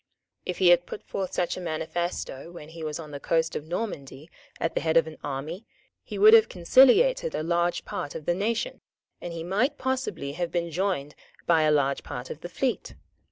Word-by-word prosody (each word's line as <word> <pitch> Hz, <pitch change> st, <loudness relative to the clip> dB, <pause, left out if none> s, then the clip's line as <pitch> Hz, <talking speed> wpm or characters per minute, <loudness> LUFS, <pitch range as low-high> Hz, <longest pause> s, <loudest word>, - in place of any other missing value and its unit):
If 180 Hz, -, -2 dB
he 185 Hz, -2 st, +5 dB
had 175 Hz, 0 st, +5 dB
put -, -, -7 dB
forth 190 Hz, -2 st, -4 dB
such 175 Hz, -, -1 dB
a -, -, -5 dB
manifesto 165 Hz, -2 st, -3 dB
when 160 Hz, -3 st, -10 dB
he 165 Hz, 0 st, -9 dB
was 155 Hz, -1 st, -3 dB
on 155 Hz, -2 st, -8 dB
the 145 Hz, -, -6 dB
coast 165 Hz, +2 st, 0 dB
of 150 Hz, -, -5 dB
Normandy 160 Hz, -6 st, -5 dB, 0.3 s
at 165 Hz, -, -1 dB
the -, -, -1 dB
head 160 Hz, 0 st, +2 dB
of 165 Hz, -, +5 dB
an 160 Hz, -1 st, -10 dB
army, 145 Hz, +8 st, -5 dB, 0.4 s
he -, -, -7 dB
would 430 Hz, +2 st, +8 dB
have 450 Hz, -1 st, +7 dB
conciliated 430 Hz, -, +4 dB
a -, -, -2 dB
large 170 Hz, +1 st, 0 dB
part 145 Hz, -, -5 dB
of 155 Hz, -, -6 dB
the 175 Hz, -, +2 dB
nation, 225 Hz, +6 st, -2 dB, 0.4 s
and 175 Hz, -, -5 dB
he 165 Hz, -1 st, -5 dB
might 225 Hz, -, 0 dB
possibly 255 Hz, -, -2 dB
have 170 Hz, +3 st, -3 dB
been 170 Hz, -1 st, -1 dB
joined 165 Hz, -5 st, -1 dB, 0.3 s
by 165 Hz, -2 st, +4 dB
a 155 Hz, 0 st, +3 dB
large 140 Hz, -2 st, +2 dB
part 125 Hz, +1 st, -7 dB
of 155 Hz, -, -8 dB
the 175 Hz, -, -6 dB
fleet. 255 Hz, +7 st, -2 dB
170 Hz, 205 wpm, -27 LUFS, 155-195 Hz, 0.4 s, would